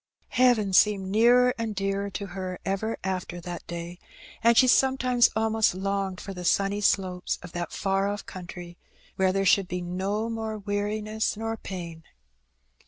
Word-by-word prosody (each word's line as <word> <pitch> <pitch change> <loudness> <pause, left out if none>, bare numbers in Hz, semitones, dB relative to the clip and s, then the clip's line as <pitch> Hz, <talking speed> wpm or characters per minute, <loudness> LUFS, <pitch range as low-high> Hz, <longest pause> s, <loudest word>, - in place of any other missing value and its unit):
Heaven 240 -6 +3
seemed 195 -1 +3
nearer 245 +3 +5
and 225 -2 -3
dearer 195 +1 -1
to 200 0 -5
her 185 -1 -5
ever 195 +4 -1
after 185 -2 -3
that 175 0 -7
day^ 170 +1 -6 0.4
and 235 0 +5
she 255 - +7
sometimes 255 -1 +4
almost 220 -3 +2
longed 195 -1 -2
for 195 - -7
the 180 -1 -7
sunny 200 +3 +1
slopes 185 -3 0
of 180 - -9
that 175 0 -4
far 195 0 0
off 205 0 -4
country 175 -1 -9 0.4
where 190 -1 +3
there 195 +1 0
should 195 0 +4
be 180 0 -3
no 190 +5 -2
more 220 -1 -4
weari 205 +1 -2
ness 215 0 -2
nor 225 +1 -3
pain. 170 -6 -7
195 Hz, 165 wpm, -26 LUFS, 185-220 Hz, 0.4 s, she